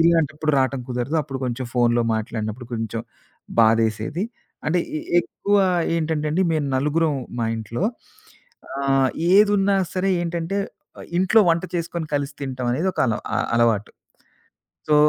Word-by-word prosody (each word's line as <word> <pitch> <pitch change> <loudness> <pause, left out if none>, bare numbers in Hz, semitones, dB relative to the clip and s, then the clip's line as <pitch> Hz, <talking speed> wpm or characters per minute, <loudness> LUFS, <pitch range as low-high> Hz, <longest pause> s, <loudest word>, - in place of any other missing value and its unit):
ఇలాంటప్పుడు 155 -2 +2
రాటం 130 0 +1
కుదరదు. 125 +5 -1
అప్పుడు 135 -2 -6
కొంచెం 125 +1 -3
ఫోనులో 120 -1 +3
మాట్లాడినప్పుడు 110 +2 -4
కొంచెం 115 -1 -3 0.6
బాధేసేది. 115 - +2 0.4
అంటే, 170 +4 +2 0.2
ఎ - - -5 0.2
ఎక్కువ 205 +3 -1 0.4
ఏంటంటే 155 -2 -1
అండి, 180 +4 +2
మేము 155 -3 0
నలుగురం 150 +3 +1 0.2
మా 115 - +1
ఇంట్లో. 110 - -4 1.0
ఆహ్, 135 -1 +3 0.3
ఏదున్నా 200 -1 +4 0.2
సరే 190 +1 +1
ఏంటంటే, 170 +3 -2 0.4
ఆహ్, - - -9
ఇంట్లో 190 +5 +5
వంట 165 +1 +1
చేసుకొని 170 -1 -3
కలిసి 145 0 -1
తింటం 130 -2 -3
అనేది 160 +9 0
ఒకాలో 115 -4 +1 0.2
అ - - +1 0.2
అలవాటు. 115 -3 +2 1.0
సో 150 - +4
145 Hz, 130 wpm, -23 LUFS, 120-165 Hz, 1.0 s, ఇంట్లో